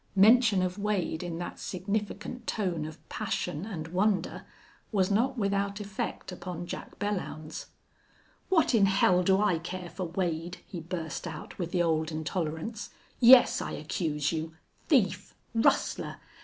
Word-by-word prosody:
Mention 215 -1 +6
of 180 +2 -2
Wade 200 -6 -1
in 175 -2 -4
that 175 - -6
significant 205 +5 -3
tone 180 -7 -1
of 155 - -12
passion 150 +6 -3
and 165 -7 -5
wonder 185 0 0 0.4
was 195 -3 +2
not 250 +6 +2
without 200 -1 0
effect 200 -1 -4
upon 180 -1 -6
Jack 175 - -7
Belllounds. 185 -7 -4 0.8
"What 335 -7 +4
in 205 -4 +5
hell 185 -2 +4
do 190 +1 +3
I 205 -6 +2
care 180 +1 -6
for 185 - -4
Wade?" 175 0 -2
he 180 - -6
burst 165 -1 -4
out, 160 -2 -7
with 175 -2 -2
the 175 -2 +2
old 160 -1 +1
intolerance. 160 +6 -3 0.3
"Yes, 250 +1 +8
I - - -4
accuse 150 -5 -1
you. 160 0 -3 0.3
Thief, 195 - +2 0.2
rustler!... 225 0 +1
185 Hz, 140 wpm, -29 LUFS, 165-205 Hz, 0.8 s, Yes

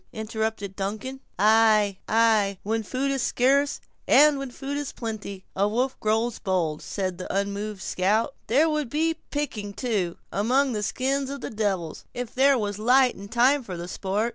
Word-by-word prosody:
interrupted 220 -2 -3
Duncan. 215 +7 -4 0.2
"Ay, 215 -2 +4
ay; 220 -3 +3
when 225 +2 0
food 260 +6 -2
is 270 -1 -1
scarce, 275 +4 +2 0.3
and 295 0 +6
when 275 -1 -4
food 270 +3 -5
is 290 -1 -3
plenty, 210 -4 -6
a 200 +2 +2
wolf 250 +5 0
grows 225 +2 0
bold," 170 -5 -1
said 185 -3 -3
the 185 - -5
unmoved 200 +1 -2
scout. 215 +8 +1
"There 285 +8 +4
would 305 -5 -1
be 320 +4 0
picking, 220 -9 -3
too, 200 -8 -2
among 255 +7 +2
the 215 -3 -2
skins 265 +5 -1
of 280 -1 -6
the - - -5
devils, 195 -7 -2
if 245 -1 -5
there 270 +1 +4
was 205 -2 -3
light 250 +3 +4
and 200 +1 -11
time 255 +5 +4
for 190 -8 -7
the 170 +1 -6
sport. 200 +5 -1
220 Hz, 170 wpm, -25 LUFS, 200-265 Hz, 0.3 s, and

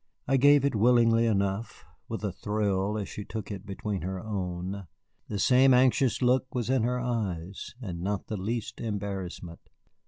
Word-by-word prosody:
I 135 - +3
gave 145 +1 +6
it 140 - +1
willingly 115 +1 +4
enough, 100 +1 -1 0.2
with - - -5
a - - -1
thrill 105 -1 -1
as 105 - -3
she 105 - -6
took 110 +1 -6
it 100 0 -7
between 100 0 -3
her 95 +2 -3
own. 95 -1 -4 0.4
The 105 - -3
same 130 +5 +5
anxious 130 0 +3
look 130 +1 +2
was 125 0 -1
in 130 -2 +3
her 125 +2 0
eyes, 100 -7 -3
and 90 -9 -6
not 100 +2 -2
the 110 - -4
least 110 +4 -4
embarrassment. 95 -6 -4
105 Hz, 165 wpm, -28 LUFS, 95-120 Hz, 0.4 s, gave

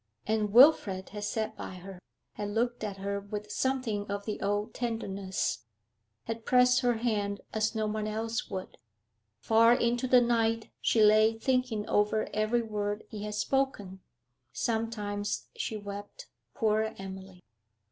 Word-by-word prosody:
And 215 -1 0
Wilfrid 220 -7 +5
had 205 0 -6
sat 220 +1 -2
by - - -7
her, 185 0 -10 0.3
had 205 -1 -4
looked 235 +2 -1
at 200 -2 -4
her 200 +1 -2
with 210 +1 -7
something 245 -6 -1
of 200 0 -3
the 215 - -4
old 205 +2 -1
tenderness, 200 - -3 0.6
had 225 0 -5
pressed 250 0 +5
her 245 -2 +2
hand 210 -3 -1
as 220 +1 0
no 220 -1 0
one 215 0 -2
else 225 +1 -3
would. 185 -8 -6 0.6
Far 230 +1 +5
into 240 +2 0
the 250 0 +7
night 230 -2 +1
she 220 - +3
lay 215 +1 +5
thinking 250 -3 0
over 210 +1 +1
every 215 +3 +1
word 210 -1 -3
he 210 -1 -6
had 210 0 -4
spoken. 210 -6 -1 0.5
Sometimes 210 - -2
she 220 - -3
wept 205 - -8 0.3
poor 220 0 +1
Emily! 190 -1 -9
215 Hz, 145 wpm, -30 LUFS, 205-230 Hz, 0.6 s, the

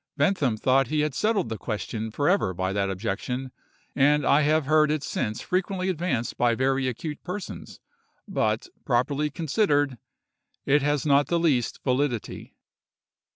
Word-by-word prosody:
Bentham 145 - +1
thought 130 +3 +3
he 150 +2 0
had 150 -2 -1
settled 210 - 0
the 110 -2 -5
question 110 +1 -4
for 145 +6 -1
ever 180 - +2
by 95 +1 -1
that 100 -1 0
objection; 115 +7 -3 0.4
and 145 +1 +3
I 145 - +4
have 155 0 +2
heard 155 +1 +4
it 150 -1 -1
since 110 -5 -3
frequently 185 0 -1
advanced 155 -9 -2
by 120 -1 +3
very 130 +1 +1
acute 145 +5 -5
persons; 185 +2 -7 0.5
but, - - 0 0.2
properly 140 +4 +1
considered, 145 - 0 0.7
it 145 +2 +3
has 145 0 0
not 145 -1 +4
the 170 - +1
least 145 -8 0
validity. 130 -3 -2
140 Hz, 150 wpm, -26 LUFS, 120-155 Hz, 0.7 s, I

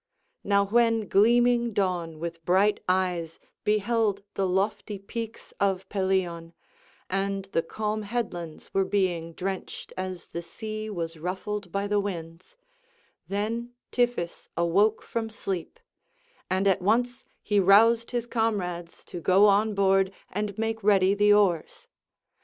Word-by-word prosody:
Now 200 0 +3
when 225 0 +2
gleaming 240 +2 +4
dawn 175 -5 -1
with 165 +1 -6
bright 195 +5 +3
eyes 180 -3 0 0.3
beheld 210 -1 +1
the 195 - 0
lofty 200 +2 -1
peaks 225 +3 -7
of 195 -1 0
Pelion, 185 -4 -1 0.5
and 195 0 -1
the 165 - +2
calm 215 +5 -3
headlands 200 -7 -5
were 195 - +3
being 180 -4 -1
drenched 190 +2 -5
as 185 -1 -5
the 170 - -5
sea 215 +5 -6
was 165 -5 -4
ruffled 185 +3 -4
by 200 +2 -1
the 205 0 +1
winds, 175 - -6 0.7
then 230 +4 -3 0.2
Tiphys 240 -9 -1
awoke 195 +6 +2
from 225 -1 -3
sleep; 195 - -5 0.7
and 190 +2 +1
at 195 -1 +3
once 240 +5 +1 0.2
he 205 -1 +2
roused 225 +5 +5
his 240 -2 -2
comrades 195 -8 -2
to 175 - -7
go 190 +4 +5
on 210 +1 +3
board 195 -1 +3 0.2
and 205 +1 -3
make 225 -1 -2
ready 195 -2 +4
the 205 +1 +4
oars. 195 -6 +2
200 Hz, 130 wpm, -27 LUFS, 180-215 Hz, 0.7 s, roused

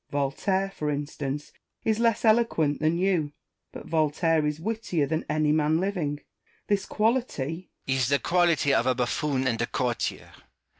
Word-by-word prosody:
Voltaire, 190 +8 0
for 150 -6 -3
instance, 145 0 -4 0.3
is 220 0 +1
less 230 -1 +2
eloquent 215 -10 +3
than 155 +2 +1
you: 175 -6 +1 0.4
but - - -9
Voltaire 155 0 +1
is 150 +1 -2
wittier 185 -5 -1
than 160 +3 -2
any 155 -1 +2
man 155 +1 +2
living. 170 -7 -2 0.4
This 200 -2 0
quality 210 - -1 0.2
Rousseau. 135 0 +1
Is 120 - +2
the 140 - +4
quality 170 -4 +2
of 125 - +2
a 130 - +3
bufFoon 130 +2 0
and 115 -3 0
a 115 - 0
courtier. 125 -3 -2
155 Hz, 155 wpm, -26 LUFS, 145-190 Hz, 0.4 s, the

